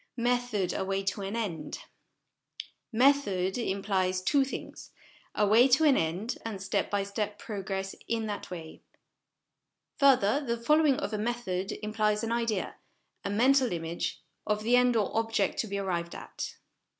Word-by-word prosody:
Method 240 -5 0
a - - -1
Way 195 +1 -1
to 195 +1 -2
an 195 +2 -4
End. 175 -10 -4 1.1
Method 220 -7 +3
implies 190 -4 0
two 280 +6 +3
things 265 - -7 0.5
a 210 - +3
way 225 +5 +6
to 270 +5 +4
an 290 -4 +6
end, 180 +9 -1
and 220 -4 -5
step 195 - -1
by 200 -1 0
step 205 +1 -3
progress 195 -2 -4
in 230 -1 -1
that 205 -1 -5
way. 165 -3 -8 1.2
Further, 275 -1 +4
the 235 -3 -1
following 300 +4 +4
of 215 - -3
a 210 - -1
method 210 -5 -2
implies 215 0 0
an 225 - -2
idea, 230 -4 -1 0.5
a - - -2
mental 255 +4 +3
image, 165 0 -3 0.2
of 210 0 0
the 240 +3 +4
end 250 -1 +4
or 215 -3 0
object 225 -3 0
to 225 - 0
be 200 0 -3
arrived 175 -3 -2
at. - - -6
210 Hz, 155 wpm, -29 LUFS, 195-240 Hz, 1.2 s, way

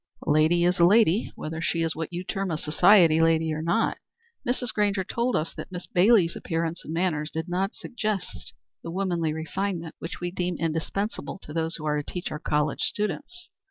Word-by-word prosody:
"A 160 - +1
lady 160 +3 +4
is 180 +1 +2
a - - +6
lady, 205 +2 +4
whether 160 +1 -5
she 170 -1 0
is 165 -1 -1
what 160 +1 -4
you 175 +1 -4
term 195 0 -3
a 160 - -1
society 165 +1 +5
lady 160 -1 +3
or 155 - -3
not. 170 +8 +1 0.5
Mrs. 245 -2 0
Grainger 205 -2 +1
told 235 +6 -1
us 155 - -1
that - - -8
Miss 180 -1 -6
Bailey's 185 -2 +4
appearance 165 -1 -3
and - - -7
manners 165 -3 0
did 160 +2 -4
not 190 +3 -1
suggest 215 -6 -4 0.3
the - - -7
womanly 175 -3 -1
refinement 165 +2 -3
which 165 - -6
we 175 0 -3
deem 180 -2 -2
indispensable 165 +7 -3
in 150 - -8
those 165 0 -1
who 155 - -7
are 150 -1 +1
to - - -10
teach 180 - -4
our 150 - -4
college 150 -1 0
students. 210 - -3
170 Hz, 195 wpm, -26 LUFS, 160-195 Hz, 0.5 s, a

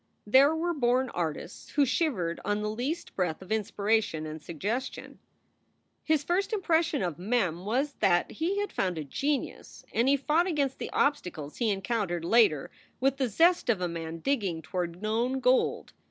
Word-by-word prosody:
There 270 +8 +5
were 345 +2 0
born 255 -2 +1
artists 165 0 -4
who 290 -1 +4
shivered 240 - 0
on 205 0 -1
the 210 - -1
least 265 +10 -4
breath 175 -4 -1
of 190 +2 -12
inspiration 210 -5 0
and 155 0 -7
suggestion. 210 - -4 0.8
His 310 -2 +2
first 360 +7 0
impression 330 - +1
of 175 -4 -3
Mem 185 -4 0
was 265 +7 0
that 175 -2 +2
he 350 +6 -1
had 410 -1 -2
found 180 -3 -1
a 155 - -3
genius, 275 - -3
and 235 +3 +2
he 280 - +4
fought 310 +6 +2
against 285 -6 -1
the - - -4
obstacles 175 - -1
he 235 -3 +1
encountered 195 -4 -1
later 200 - +3 0.3
with 270 +1 +2
the 265 -3 0
zest 340 - +3
of 220 -5 +3
a 180 - 0
man 165 -1 -6
digging 195 - -1
toward 175 +3 -4
known 235 +5 0
gold. 255 0 +1
225 Hz, 170 wpm, -28 LUFS, 175-280 Hz, 0.8 s, There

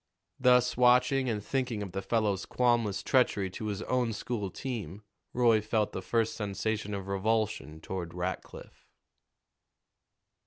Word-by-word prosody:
Thus 125 -1 +4
watching 125 +2 +4
and 105 -3 -3
thinking 125 -6 -1
of 95 - -7
the 95 +2 -3
fellow's 105 -3 0
qualmless 120 -5 +1
treachery 105 -8 +2
to 110 +3 -5
his 105 -1 -3
own 125 -3 0
school 105 -2 -3
team, 105 - -6 0.3
Roy 115 -3 +4
felt 105 0 0
the 95 - -5
first 115 +3 0
sensation 105 0 -2
of 100 -1 -6
revulsion 100 -5 -1
toward 85 -1 -5
Rackliff. 90 +1 -6
110 Hz, 130 wpm, -30 LUFS, 100-125 Hz, 0.3 s, Thus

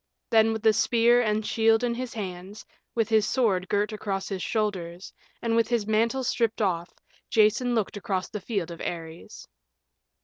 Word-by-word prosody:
Then 225 -1 +5
with 220 0 -4
the 220 -1 +5
spear 235 +3 +4
and 215 -2 0
shield 225 +1 +3
in 240 -1 +1
his 245 0 -5
hands, 190 0 -7 0.3
with 225 -2 +1
his 220 -2 +3
sword 200 -8 +1
girt 205 +2 0
across 195 -2 -3
his 195 -2 -4
shoulders, 190 -5 -3 0.3
and 230 -1 +1
with 230 -1 +3
his 235 -4 0
mantle 230 +5 +1
stripped 230 -2 0
off, 175 -4 -1 0.4
Jason 225 +3 +3
looked 215 -2 -1
across 195 -3 -2
the 210 - -6
field 190 -4 -3
of 170 - -9
Ares. 165 -1 -7
215 Hz, 170 wpm, -26 LUFS, 195-230 Hz, 0.4 s, Then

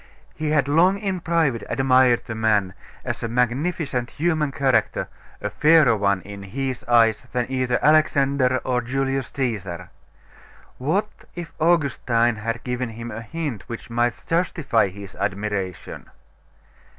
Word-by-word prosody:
He 155 -1 -3
had 145 -3 +2
long 175 +7 +4
in 195 -3 -2
private 165 -8 +1
admired 130 -2 +3
the 110 - -5
man, 105 -4 +1 0.3
as - - -3
a 115 - -2
magnificent 125 +2 -1
human 155 -2 0
character, 130 -6 +1 0.3
a 105 - -4
fairer 150 0 +5
one, 100 -2 +1
in 100 0 -9
his 130 +6 -4
eyes, 115 -3 +3
than 125 -1 0
either 130 -1 +1
Alexander 140 -4 +3
or 125 -1 0
Julius 135 +1 -1
Caesar.... 95 -9 -4 0.9
What 185 +11 0 0.2
if 175 -2 -7
Augustine 130 -8 +2
had 115 +2 -4
given 125 -1 -2
him 115 +1 -7
a 110 +1 -6
hint 140 -3 -5
which 115 0 -7
might 120 0 0
justify 160 - +1
his 100 0 -10
admiration?.... 100 -2 -4
125 Hz, 135 wpm, -23 LUFS, 110-145 Hz, 0.9 s, fairer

